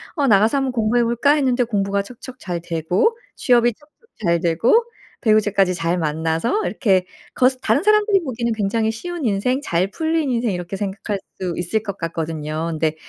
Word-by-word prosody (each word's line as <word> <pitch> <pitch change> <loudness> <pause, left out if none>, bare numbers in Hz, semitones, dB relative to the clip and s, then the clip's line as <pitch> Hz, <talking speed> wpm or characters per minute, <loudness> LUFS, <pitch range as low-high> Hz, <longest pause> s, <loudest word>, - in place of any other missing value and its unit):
"어 285 -4 +1
나가서 220 +4 +4
한번 270 -2 0
공부해 230 +1 +2
볼까?" 235 +5 +2
했는데 260 -4 +2
공부가 200 -3 0
척척 250 +4 -11
잘 175 -2 -4
되고 175 - 0 0.2
취업이 240 -1 +3
척척 305 - -27 0.2
잘 170 0 +3
되고 225 - +3 0.4
배우자까지 205 -4 +3
잘 170 +1 -1
만나서 160 - -1
이렇게 190 -7 +1 0.3
겉 255 +1 +4
다른 290 - +1
사람들이 425 -2 +4
보기에는 235 -3 -2
굉장히 220 +1 0
쉬운 345 +7 -6
인생 245 +5 0
잘 180 0 0
풀린 320 0 0
인생 235 -1 0
이렇게 180 +1 -4
생각할 200 +1 -3 0.2
수 180 -2 -2
있을 205 +5 -1
것 200 -3 -5
같거든요. 160 -1 -3
근데 155 0 -1
215 Hz, 370 characters per minute, -20 LUFS, 175-255 Hz, 0.4 s, 나가서